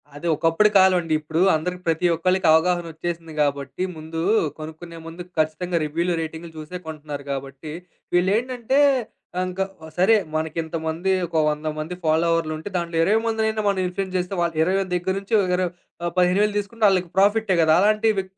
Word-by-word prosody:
‌అది 145 +4 -5
ఒకప్పుడు 165 +7 +3
కాలమండి. 180 -4 +4
ఇప్పుడూ 160 +2 -2
అందరికి 180 +3 -3
ప్రతి 165 +2 +1
ఒక్కలకి 185 +2 +1
అవగాహనొచ్చేసింది 165 0 0
గాబట్టి, 140 +3 -1
ముందు 160 +1 -5 0.4
కొనుక్కునే 160 +2 -9
ముందు 165 +2 -8 0.2
ఖచ్చితంగా 155 +3 0
రివ్యూలు, 170 +4 -1
రేటింగులు 160 +1 -7
జూసే 155 +4 -6
కొంటన్నారు 150 -2 -7
గాబట్టి, 140 +2 -6 0.4
వీళ్ళేంటంటే 235 +8 +1 0.6
ఆహ్, - - +1
ఇంకా 185 +1 -2 0.3
సరే 185 +5 +4 0.2
మనకింతమంది, 160 +2 -2
ఒక 165 -1 -1
100 150 +1 -1
మంది 160 +4 -4
ఫాలోవర్లుంటే, 160 +1 +1
దాంట్లో 170 -1 -3
20 210 +6 +3
మందినైనా 220 -1 0
మనం 200 -1 +1
ఇన్‌ఫ్లు‌యెన్స్ 190 +1 -4
జేస్తే 180 +1 -1
వాళ్ళ్ 170 -1 0
20,000ల 190 +3 +1
దగ్గెర 180 +1 0
నుంచి 200 +3 -8 0.2
ఇర 180 - 0 0.4
ఆహ్, 175 - -1
15,000 195 +4 +3
తీసుకుంటే 215 +3 -6
వాళ్ళకి 185 -3 +2
ప్రాఫిట్టే 205 0 +3
గదా! 160 -1 +4
అలాంటివి 215 -1 +2
175 Hz, 145 wpm, -23 LUFS, 160-190 Hz, 0.6 s, కాలమండి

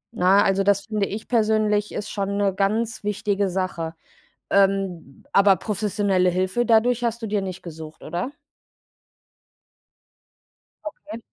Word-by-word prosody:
Ne, 180 - -1 0.2
also 195 0 +2
das 200 0 +2
finde 210 -3 -1
ich 215 +2 -6
persönlich 215 -2 +1
ist 210 - -5
schon 200 0 -2
'ne 200 -1 +1
ganz 215 +4 -1
wichtige 205 -1 -1
Sache. 175 -3 -3 0.5
Ähm, 195 -7 0
aber 200 -1 +5
professionelle 200 -3 0
Hilfe 185 +6 0
dadurch 235 +2 +3
hast 235 0 -2
du 225 - -3
dir 205 -1 0
nicht 185 -2 -6
gesucht, 160 -2 -10
oder? 175 - -4 2.5
Okay. 305 -5 -8
200 Hz, 125 wpm, -23 LUFS, 185-215 Hz, 2.5 s, aber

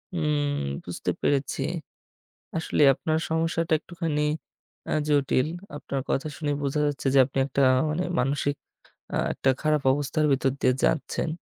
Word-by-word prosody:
উম 150 -3 0 0.3
বুঝতে - - -2
পেরেছি। 140 -1 0 1.0
আসলে 160 - 0
আপনার 155 +4 -1
সমস্যাটা 165 0 0
একটুখানি 165 -3 -3 0.7
আ - - -2 0.2
জটিল। 140 -2 +2 0.3
আপনার 140 -2 -3
কথা 140 - 0
শুনে 150 -1 -1
বোঝা 140 +2 0
যাচ্ছে 145 -1 -2
যে, - - +5
আপনি 135 - -7
একটা 140 0 0 0.3
মানে 160 +4 -1 0.2
মানসিক 140 +2 0 0.6
আ - - 0 0.2
একটা 135 - +1
খারাপ 155 -1 +2
অবস্থার 145 +3 0
ভিতর 135 0 +2
দিয়ে 130 - +4
যাচ্ছেন। 155 +2 0
145 Hz, 135 wpm, -26 LUFS, 140-155 Hz, 1.0 s, যে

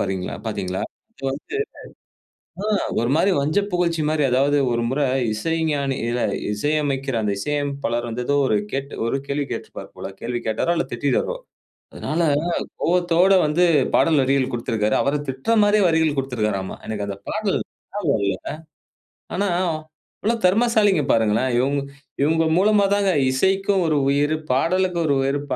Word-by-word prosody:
பாத்திங்களா 95 -2 -2
பார்த்தீங்களா? 95 0 -3 0.3
அது 135 - -14
வந்து 150 - -6 1.1
ம் 215 -2 +1 0.2
ஒரு 120 - 0
மாதிரி 190 +4 +3
வஞ்சப்புகழ்ச்சி 175 +1 0
மாதிரி 155 -2 +1
அதாவது, 140 +3 +3
ஒரு 120 0 0
முறை 140 +2 +1 0.3
இசைஞானி 145 +1 -1 0.6
இசையமைக்கிற 135 +2 -1
அந்த 105 -1 0
இசையமைப்பாளர் 140 -2 -2
வந்து 125 +2 -3
ஏதோ, 145 - +2
ஒரு 110 - +2 0.5
ஒரு 125 +4 0
கேள்வி 140 0 -1
கேட்டிருப்பார் - - -7
போல. - - -6
கேள்வி 120 +1 -2
கேட்டாரோ 110 +10 +1
இல்ல 170 - 0
திட்டிட்டாரோ. 140 - 0 0.6
அதனால 160 +3 -2 0.6
கோபத்தோடு 180 +2 +3
வந்து 155 +4 +2 0.3
பாடல் 155 -4 +4
வரிகள் 135 0 +1
குடுத்திருக்காரு. 110 -2 0
அவரை 145 +2 +1
திட்டுற 135 +13 0
மாதிரியே 205 0 +4
வரிகள் 160 -2 +2
குடுத்திருக்காராம். 105 -8 -2
எனக்கு 105 -2 -3
அந்த 100 - -5
பாடல் 210 -2 0 0.4
ஞாபகம் 155 - 0
இல்லை. 95 -1 -1 1.0
ஆனா 200 +1 0 0.7
இவ்வளவு 225 -1 0
தெறமசாலிகள் 205 - +3
பாருங்களேன்! 115 +3 +2 0.7
இவுங்க 160 +2 +2
மூலமா 205 +1 +4
தாங்க 200 -1 +2 0.2
இசைக்கும் 190 +6 +2
ஒரு 155 - +2
உயிரு, 145 +2 +2 0.2
பாடலுக்கும் 175 +4 +1
ஒரு 140 - +3
உயிரு, 140 +1 0
145 Hz, 130 wpm, -22 LUFS, 125-180 Hz, 1.1 s, பாடல்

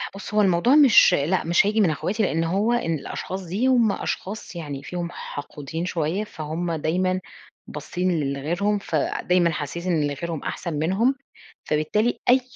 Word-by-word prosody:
بُص 200 +1 -8
هو 210 - +4
الموضوع 195 +7 +4
مش 275 -10 +7
لأ، 175 +4 +1
مش 170 +4 +3
هيجي 215 +2 +2
من 190 - +4
أخواتي 195 +8 -1
لأن 165 -4 +1
هو 200 +8 +1
إن 200 -9 0
الأشخاص 190 +6 -5
دي 200 +9 0
هم 240 -5 +4
أشخاص 200 0 -5
يعني 145 -5 -6
فيهم 175 +3 -4
حقودين 145 +3 -6
شويّة، 175 +2 -1
فهمّ 165 -2 -4
دايمًا 180 +4 0 0.5
باصين 180 -2 -2
ل 140 -2 -1
لغيرهم، 175 +9 0
فدايمًا 175 +1 +1
حاسين 165 +4 -3
إن 150 -3 +1
غيرهم 165 +2 -5
أحسن 170 -2 -4
منهم، 190 - +1 0.5
فبالتالي 210 +10 0
أي 255 +1 +6
175 Hz, 160 wpm, -24 LUFS, 155-205 Hz, 0.5 s, مش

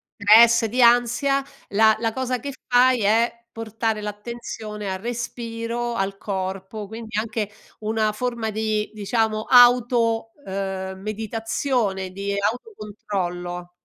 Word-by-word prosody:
stress, 225 +3 +6
di 240 +4 0
ansia, 245 +3 +4 0.3
la 220 +2 +4
la 225 -1 -1
cosa 255 -1 -2
che 280 +2 -6
fai 250 0 +4
è 230 +3 +2
portare 225 -1 -3
l'attenzione 210 -1 -6
al 190 - -4
respiro, 235 +1 -4
al 195 -1 -2
corpo, 195 +1 -5
quindi 220 0 -7
anche 220 -1 -2 0.3
una 215 0 0
forma 235 0 -3
di 215 0 -1
diciamo 215 +1 0
auto, 240 -2 +5
uhm, 190 -1 -4
meditazione, 220 -1 -2
di 200 +1 -3
autocontrollo. 195 - -4
220 Hz, 115 wpm, -23 LUFS, 205-235 Hz, 0.3 s, stress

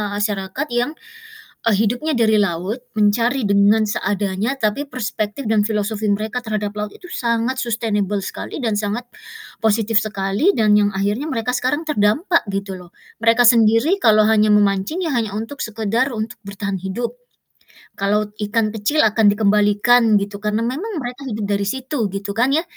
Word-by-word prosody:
masyarakat 205 +6 -2
yang, 245 +5 +1 0.8
eee, 225 - +4
hidupnya 245 +9 0
dari 220 -1 +3
laut, 200 +5 -1 0.2
mencari 230 +5 +2
dengan 200 +2 +4
seadanya, 205 +3 -1
tapi 225 +6 -1
perspektif 220 0 -4
dan 215 -2 +3
filosofi 215 0 -2
mereka 215 +4 -2
terhadap 210 -1 -2
laut 210 0 -3
itu 360 - -13
sangat 235 +2 -1
sustainable 210 -4 -1
sekali - - -6
dan 225 -3 0
sangat 210 +4 -2 0.6
positif 220 0 +1
sekali, 205 - 0
dan 215 -3 +3
yang 205 -1 +3
akhirnya 205 +10 -1
mereka 250 +1 -2
sekarang 290 +6 -1
terdampak, 305 - +2
gitu 195 -1 -4
loh. 180 -1 -13 0.3
Mereka 230 +1 +5
sendiri 230 - +4
kalau 215 -2 +5
hanya 215 -1 +3
memancing, 200 - +2
ya 320 -7 -1
hanya 225 -3 0
untuk 225 +6 -5
sekedar 225 +4 -1
untuk 220 +1 -4
bertahan 200 0 -4
hidup. 190 - -4 0.8
Kalau 205 +1 0
ikan 215 +1 0
kecil 220 +8 0
akan 220 +1 0
dikembalikan 210 +2 +3
gitu, 200 0 -5
karena 210 +1 -1
memang 315 - -3
mereka 250 +3 -7
hidup 215 -3 -3
dari 200 0 0
situ, 260 -1 -2
gitu 200 +1 -5
kan, 250 +4 +2
ya. 320 - +2
215 Hz, 155 wpm, -20 LUFS, 205-245 Hz, 0.8 s, Mereka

